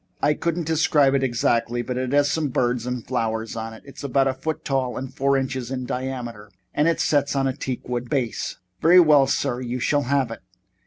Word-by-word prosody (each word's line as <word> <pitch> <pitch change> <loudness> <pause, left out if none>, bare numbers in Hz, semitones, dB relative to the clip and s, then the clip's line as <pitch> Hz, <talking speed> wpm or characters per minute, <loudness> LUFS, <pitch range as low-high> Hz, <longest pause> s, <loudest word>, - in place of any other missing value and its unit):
I 150 - +3
couldn't 170 +2 -2
describe 150 -3 +3
it 135 - +2
exactly, 120 -1 +1
but 125 +1 -4
it 130 0 -2
has 145 0 +3
some 160 -2 0
birds 125 -2 0
and 125 -2 -3
flowers 115 -3 -2
on 115 0 -5
it. - - -15
It's 140 - -11
about 135 0 +2
a 135 - +1
foot 155 +4 -4
tall 130 -3 -1
and 130 0 -6
four 140 +1 +2
inches 130 -2 -3
in 130 -1 -3
diameter 125 -5 -5 0.2
and 165 +2 +2
sets 145 -1 +1
on 135 -1 +1
a 130 - -2
teak 130 -2 -5
wood 120 0 -3
base." 125 -6 -2 0.2
"Very 175 +3 +7
well, 150 -5 +6
sir. 135 -2 -1
You 125 0 -3
shall 145 +3 +1
have 135 -4 +1
it." 115 - -6
130 Hz, 210 wpm, -23 LUFS, 120-140 Hz, 0.2 s, Very